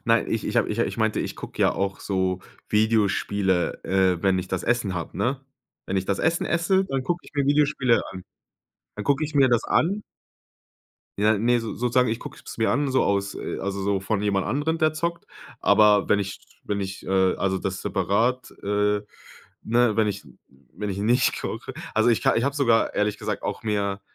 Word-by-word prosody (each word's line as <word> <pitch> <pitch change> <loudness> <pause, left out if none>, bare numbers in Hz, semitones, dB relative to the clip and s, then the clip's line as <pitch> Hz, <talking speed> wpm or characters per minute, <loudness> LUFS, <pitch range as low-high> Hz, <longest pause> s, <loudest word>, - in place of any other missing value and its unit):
Nein, 115 0 +3
ich 115 - -1
ich - - -2
ha - - +4
ich 115 +2 -2
meinte, 110 -1 +1
ich - - -4
gucke - - -8
ja - - +4
auch 95 0 -2
so 95 -2 -1 0.3
Videospiele, 105 -4 +1
äh, 95 -2 +2
wenn 95 -2 +3
ich 90 0 -4
das 95 -1 -2
Essen 115 -5 0
habe, 85 0 -5
ne? 125 +7 0 0.5
Wenn 95 - -2
ich 95 - 0
das 100 0 -1
Essen 165 +2 +1
esse, 190 +3 +2
dann 135 -6 -2
gucke 175 +6 -1
ich - - -14
mir 140 -1 +1
Videospiele 145 -4 +3
an. 95 -1 -8 0.7
Dann 105 - -5
gucke 140 +5 +1
ich 155 0 -4
mir 135 -2 +5
das 120 -2 +2
an. 200 +6 +1 1.2
Ja, 105 +1 +3
ne, 120 +3 +2
so 115 - -5
sozusagen, 125 +1 +2
ich 115 - -1
gucke - - -9
es - - -8
mir 110 - +2
an 140 +1 +1
so 130 - +3
aus, 100 -1 0
äh - - -5
also 100 0 -3
so 100 0 0
von 100 +1 -1
jemand 100 -2 0
anderen, 145 +9 -1
der 155 -1 +2
zockt. 170 +2 -3 0.3
Aber 105 0 +5
wenn 105 - +4
ich 100 0 -4 0.2
wenn 100 -1 -2
ich, 95 0 -5
äh, 95 -1 +2
also 95 -1 0
das 95 0 -4
separat, 105 +6 0
äh 105 0 +1 0.6
ne? 120 -1 +2
Wenn 110 -1 +3
ich 100 -3 -3 0.5
wenn 105 +4 -5
ich 95 - -4
nicht 120 +5 +2
koche. - - -5 0.2
Also 110 +2 +3
ich 115 - +1
ka - - +3
ich 115 - +1
habe 140 0 0
sogar 120 -6 +2
ehrlich 105 0 0
gesagt - - -3
auch - - -4
mehr 100 -2 -1
105 Hz, 205 wpm, -24 LUFS, 100-125 Hz, 1.2 s, mir